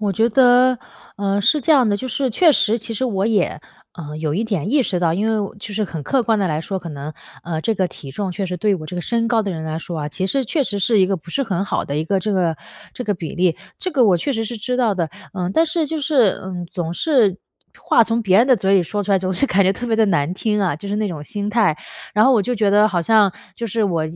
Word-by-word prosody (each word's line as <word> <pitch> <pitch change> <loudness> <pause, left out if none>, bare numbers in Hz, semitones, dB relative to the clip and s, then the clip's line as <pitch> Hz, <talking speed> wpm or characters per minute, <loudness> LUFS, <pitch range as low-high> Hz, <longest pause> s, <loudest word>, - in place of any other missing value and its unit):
我 205 -2 0
觉 225 +5 +2
得， 250 +1 +5 0.4
呃， 200 0 0
是 300 +9 +3
这 315 - +3
样 260 -6 +4
的， 205 - +1
就 260 +4 -5
是 265 +3 -1
确 330 +8 +4
实 225 -3 +2
其 225 +1 -6
实 260 - -1
我 200 -5 0
也， 205 -8 0 0.4
嗯， 150 -1 -7
有 155 -1 -2
一 215 - 0
点 200 -5 -2
意 285 -2 +3
识 180 -6 -1
到， 165 -2 +1
因 205 +5 0
为 220 - +1
我 200 -2 -4
就 205 +1 -8
是 210 +1 -1
很 165 -5 -6
客 260 - +1
观 225 -1 +1
地 195 - +1
来 155 0 -1
说， 190 +3 -4
可 170 - -8
能， 150 0 -7 0.3
呃， 160 -2 -3
这 225 +6 0
个 185 -1 +1
体 140 -5 -9
重 190 +5 -4
确 195 +1 -3
实 180 -1 -4
对 200 +3 +1
我 155 -4 -6
这 180 - -7
个 - - -2
身 230 +5 -1
高 230 -1 +2
的 200 - -3
人 160 -2 -5
来 160 0 -4
说 165 -1 -6
啊， 150 - -3
其 185 +5 -3
实 265 +6 0
确 285 +5 0
实 205 -4 -2
是 220 +1 +3
一 185 - +4
个 195 - 0
不 170 0 -13
是 275 - 0
很 195 -3 -1
好 - - -2
的 140 - -4
一 155 - -1
个 195 +4 0
这 205 +3 -2
个 170 -4 +1 0.4
这 250 - -6
个 205 - 0
比 165 -4 -7
例。 175 -2 +2 0.2
这 370 - -3
个 260 -4 +4
我 190 -5 +4
确 275 - -2
实 225 -2 -2
是 235 +1 -5
知 250 +4 -2
道 235 -5 +2
的。 170 -4 -1 0.2
嗯， 180 -2 -3
但 325 - +4
是 325 -1 -1
就 315 +1 -3
是， 275 -9 +2
嗯， 180 -2 -6
总 170 -3 -4
是 225 - +2 0.4
话 - - +3
从 230 +1 0
别 195 -3 +3
人 240 - +5
的 255 - +6
嘴 195 +1 +1
里 185 - +4
说 205 +5 -3
出 200 - 0
来， 190 - +4
总 185 0 -2
是 275 +10 +1
感 200 -4 +3
觉 190 +1 +3
特 245 +4 -6
别 225 - +1
地 220 - +4
难 170 -2 0
听 210 +1 -1
啊。 180 -7 +1
就 200 +7 -8
是 205 - -2
那 215 -1 0
种 160 -6 -5
心 205 +6 -4
态， 210 -8 +2 0.4
然 210 +3 +5
后 265 - +5
我 215 -5 +3
就 250 - -2
觉 205 -1 +2
得 210 +2 +4
好 180 -4 0
像 205 +1 +4 0.2
就 235 - -6
是 220 +2 0
我 170 -5 0
200 Hz, 320 characters per minute, -20 LUFS, 175-230 Hz, 0.4 s, 的